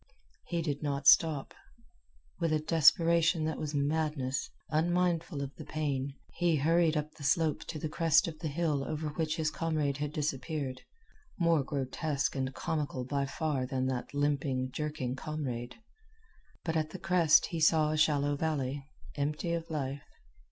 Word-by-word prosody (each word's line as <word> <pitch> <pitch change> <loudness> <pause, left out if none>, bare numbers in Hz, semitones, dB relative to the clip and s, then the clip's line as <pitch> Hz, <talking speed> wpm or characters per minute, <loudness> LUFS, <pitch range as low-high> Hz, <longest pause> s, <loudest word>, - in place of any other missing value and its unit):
He 170 -1 -1
did 145 -3 -2
not 140 -2 -2
stop. 150 -1 +5 0.9
With 165 -2 +1
a 155 - +2
desperation 165 +1 +4
that 160 -1 -2
was 150 -1 -3
madness, 145 -2 0 0.2
unmindful 170 -1 +1
of 140 0 -6
the - - -7
pain, 140 -3 -2 0.2
he 175 -2 +2
hurried 165 +2 +3
up 150 0 -2
the 150 - -12
slope 150 +2 +1
to 165 - -5
the 155 - -3
crest 160 +1 +3
of 160 -2 -6
the 165 - -3
hill 150 -2 0
over 155 +2 -3
which 155 0 -1
his 155 -2 0
comrade 155 -5 -1
had 145 0 -3
disappeared 145 -2 -3 0.6
more 170 -3 +3
grotesque 140 +2 -2
and 130 -1 -1
comical 145 -5 -2
by 140 +1 -1
far 140 -2 -1
than 130 -1 -1
that 130 -2 -2
limping, 140 -3 0
jerking 150 -4 -3
comrade. 130 -5 -4 0.9
But 165 -1 -2
at 155 -1 0
the 185 - -7
crest 170 -3 +4
he 165 - -1
saw 155 -1 +4
a - - 0
shallow 145 -2 +2
valley, 140 -3 -2 0.3
empty 150 +4 -1
of 165 -1 -3
life. 140 -3 -3
150 Hz, 160 wpm, -31 LUFS, 140-160 Hz, 0.9 s, stop